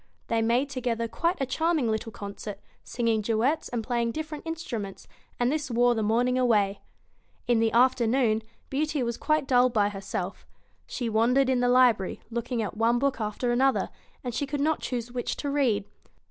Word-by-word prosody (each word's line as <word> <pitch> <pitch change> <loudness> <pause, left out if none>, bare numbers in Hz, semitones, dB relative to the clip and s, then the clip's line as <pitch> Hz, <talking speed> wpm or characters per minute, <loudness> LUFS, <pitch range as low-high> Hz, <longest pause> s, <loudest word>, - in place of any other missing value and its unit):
They 230 -1 +2
made 235 +5 +2
together 235 -3 -1
quite 340 +9 -1
a 270 - +1
charming 310 -2 +1
little 220 +1 -3
concert, 200 0 -7 0.2
singing 230 -2 0
duets 235 +9 0
and 235 -2 -2
playing 235 -1 -1
different 310 0 -6
instruments, 235 - -5 0.3
and 245 +1 +2
this 300 -2 -2
wore 245 0 +3
the 225 - -1
morning 245 +4 +2
away. 205 -5 +2 0.7
In 240 -2 +3
the 225 0 +2
afternoon, 240 -2 +3 0.3
Beauty 295 0 0
was 235 -1 -2
quite 305 +1 +1
dull 250 -2 +5
by 210 -4 +2
herself. 195 -2 -5 0.4
She 245 - -3
wandered 240 +5 +3
in 255 - +2
the 245 0 +2
library, 245 -6 +3
looking 235 0 -2
at 205 - -5
one 230 +2 +2
book 270 -2 0
after 215 +3 -1
another, 265 +2 +2 0.3
and 245 -2 -4
she 280 +4 -2
could 285 +1 -3
not 310 +2 +1
choose 240 -1 -4
which 245 -1 -2
to 285 - -3
read. 240 -8 +1
240 Hz, 175 wpm, -27 LUFS, 225-270 Hz, 0.7 s, dull